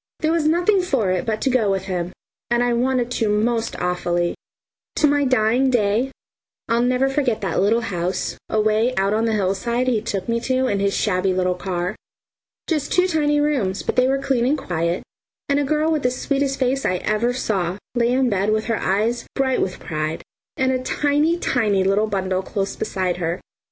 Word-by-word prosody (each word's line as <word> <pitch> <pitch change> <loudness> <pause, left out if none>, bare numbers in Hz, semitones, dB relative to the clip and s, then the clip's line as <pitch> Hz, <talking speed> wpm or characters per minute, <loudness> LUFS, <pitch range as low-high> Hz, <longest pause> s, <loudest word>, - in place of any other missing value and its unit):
There 315 - +2
was 325 -2 +1
nothing 355 +5 +3
for 265 - 0
it 185 +4 -1
but 220 -1 -1
to 265 - +1
go 235 -5 +2
with 195 -1 0
him, 180 -2 -3 0.4
and 240 0 +2
I 245 0 +1
wanted 245 0 0
to 225 -3 0
most 225 +2 0
awfully. 175 -1 0 0.6
To 305 - +3
my 290 -1 +3
dying 255 +1 +3
day 235 +2 +1 0.6
I'll 230 +1 +2
never 250 +2 +2
forget 270 -5 0
that 190 -4 -1
little 220 +4 +3
house, 180 -4 -2
away 215 +3 +2
out 195 +1 +1
on 220 +1 +1
the 225 - +1
hillside, 215 +6 0
he 235 -4 +2
took 205 -4 -3
me 235 0 +1
to 260 +2 0
in 200 -6 0
his 200 0 +1
shabby 185 -2 +1
little 185 0 +1
car. 180 +1 -3 0.7
Just 305 -4 -1
two 360 - +4
tiny 295 -4 +1
rooms, 265 -11 0
but - - -2
they 255 0 +4
were 270 +1 +2
clean 270 -3 0
and 295 +3 +2
quiet, 170 - -2 0.4
and 280 0 +2
a - - +1
girl 305 +3 +1
with 310 -2 +1
the 250 - +2
sweetest 275 +2 -1
face 265 +1 0
I 180 - +1
ever 215 +6 0
saw, 195 -7 -1 0.2
lay 240 -1 +2
in 260 +1 +2
the 245 - +1
bed 200 +1 +1
with 215 0 0
her 230 -3 -1
eyes 220 +5 0
bright 265 -1 +1
with 185 - -2
pride, 155 0 -4 0.3
and 260 0 +2
a 255 -1 0
tiny, 295 +5 +1
tiny 210 - +1
little 200 +3 +2
bundle 190 -2 -1
close 195 0 -3
beside 185 -2 -2
her. 170 0 -2
230 Hz, 200 wpm, -21 LUFS, 195-265 Hz, 0.7 s, two